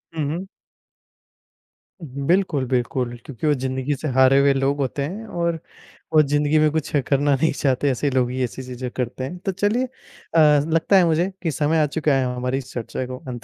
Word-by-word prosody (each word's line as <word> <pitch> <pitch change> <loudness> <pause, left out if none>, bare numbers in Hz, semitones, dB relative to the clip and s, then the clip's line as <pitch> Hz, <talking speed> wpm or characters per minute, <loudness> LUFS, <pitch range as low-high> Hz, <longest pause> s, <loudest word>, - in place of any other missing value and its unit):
हुँ, 155 - -1
हुँ। 190 +2 -6 1.5
उहुँ, 140 -3 -6
बिल्कुल, 170 -7 +2
बिल्कुल, 125 0 -1
क्योंकि 140 +2 -4
वो 150 - +4
ज़िंदगी 130 +1 -2
से 155 - -5
हारे 130 +1 +5
हुए 140 0 +4
लोग 135 +1 0
होते 140 0 -2
हैं 195 +10 -5
और 170 -4 -2 0.5
वो 155 - +7
ज़िंदगी 145 +2 +2
में 155 - +4
कुछ 155 -1 -2 0.2
करना 145 0 +2
नहीं 160 +5 +1
चाहते, 135 0 +1
ऐसे 140 +3 -1
लोग 125 -2 +1
ही 130 0 -1
ऐसी 125 +2 -4
चीज़ें 125 0 -6
करते 125 +1 -4
हैं। 175 +7 -5
तो 195 - +1
चलिए 205 +6 0
अ, - - -12 0.5
ज़ 150 -1 +5
लगता 165 +4 +3
है 180 - +5
मुझे 170 +3 +1
कि 165 - 0
समय 155 +3 +1
आ 150 - +4
चुका 150 0 0
है 130 - +1
हमारी 125 +1 -1
इस 130 -1 -7
चर्चा 120 +2 -4
को 130 0 -6
अंत 120 -2 -6
140 Hz, 205 wpm, -22 LUFS, 130-160 Hz, 1.5 s, वो